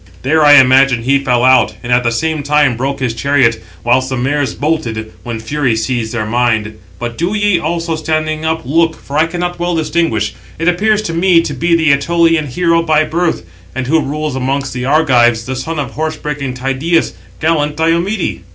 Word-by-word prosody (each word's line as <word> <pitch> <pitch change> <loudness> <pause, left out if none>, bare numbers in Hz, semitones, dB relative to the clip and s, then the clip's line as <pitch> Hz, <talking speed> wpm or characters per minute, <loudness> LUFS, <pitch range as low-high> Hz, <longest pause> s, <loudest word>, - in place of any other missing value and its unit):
There 155 +4 +2
I 145 0 +7
imagine 130 -2 +5
he 140 +3 +2
fell 125 -3 0
out, 130 -1 +4
and 120 0 -1
at 120 0 +3
the 120 - +1
same 155 +5 -1
time 145 -3 +2
broke 135 +3 -3
his 125 -3 -1
chariot, 120 -2 +1 0.2
whilst 130 +2 +1
they 130 - -2
(the 120 - -3
mares) 145 -2 -1
bolted, 115 -8 -3
when 115 -2 -5
fury 130 +1 -1
seized 110 0 -2
their 110 -2 -2
mind. 110 -2 -1 0.2
But 120 -1 -6
do 175 +5 -1
ye 205 -3 +2
also, 165 +1 -2
standing 155 0 -2
up, 160 0 -1
look, 165 +4 +1
for 140 - -10
I 160 - +3
cannot 175 +1 -4
well 175 0 -1
distinguish; 160 -9 -1 0.2
it 165 - -2
appears 210 +4 +2
to 165 - -4
me 170 0 +3
to 145 - -4
be 165 +1 +2
an 140 - +3
Ætolian 165 0 +1
hero 165 +4 +1
by 155 -2 +2
birth, 165 +3 -1 0.3
and 130 -1 -2
[who] 160 +5 +2
rules 150 0 -3
amongst 135 +1 -2
the 125 0 -4
Argives, 125 -6 +3
the 130 +1 -4
son 155 +6 -4
of 145 - -3
horse 155 +1 -3
breaking 140 -4 -4
Tydeus, 135 +6 0 0.3
gallant 150 -2 0
Diomede." 170 +6 0
145 Hz, 195 wpm, -14 LUFS, 125-165 Hz, 0.3 s, I